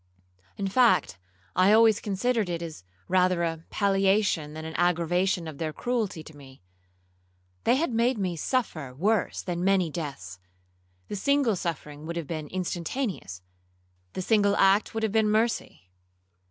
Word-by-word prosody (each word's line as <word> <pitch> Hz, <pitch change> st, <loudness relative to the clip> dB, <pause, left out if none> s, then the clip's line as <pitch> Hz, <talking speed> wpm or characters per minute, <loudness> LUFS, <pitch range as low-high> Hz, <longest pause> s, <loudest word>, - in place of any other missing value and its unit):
In 200 Hz, -, -2 dB
fact, 190 Hz, -, +3 dB, 0.4 s
I 185 Hz, +3 st, +5 dB
always 220 Hz, -1 st, +5 dB
considered 215 Hz, +1 st, -1 dB
it 170 Hz, -1 st, -3 dB
as 160 Hz, -, -8 dB, 0.2 s
rather 180 Hz, -1 st, +2 dB
a 165 Hz, -1 st, -3 dB
palliation 195 Hz, -5 st, +1 dB
than 160 Hz, 0 st, -7 dB
an 160 Hz, -, -6 dB
aggravation 175 Hz, +1 st, +1 dB
of 155 Hz, -3 st, -8 dB
their 160 Hz, -1 st, -2 dB
cruelty 220 Hz, -5 st, -2 dB
to 155 Hz, -, -13 dB
me. 135 Hz, -7 st, -15 dB, 1.0 s
They -, -, +4 dB
had 290 Hz, -2 st, 0 dB
made 235 Hz, +2 st, +2 dB
me 185 Hz, -4 st, -2 dB
suffer 160 Hz, -, -2 dB
worse 205 Hz, +7 st, 0 dB
than 175 Hz, -1 st, -3 dB
many 185 Hz, -4 st, +2 dB
deaths,—the 90 Hz, -, -9 dB
single 280 Hz, 0 st, +2 dB
suffering 155 Hz, -3 st, -5 dB
would 170 Hz, -, -4 dB
have 170 Hz, -2 st, -3 dB
been 155 Hz, 0 st, -5 dB
instantaneous,—the 175 Hz, -, -4 dB, 0.8 s
single 205 Hz, -1 st, +3 dB
act 195 Hz, +3 st, +3 dB
would 225 Hz, -, -2 dB
have 220 Hz, -, +1 dB
been 220 Hz, 0 st, +2 dB
mercy. 215 Hz, -, -1 dB
180 Hz, 140 wpm, -27 LUFS, 155-210 Hz, 1.0 s, I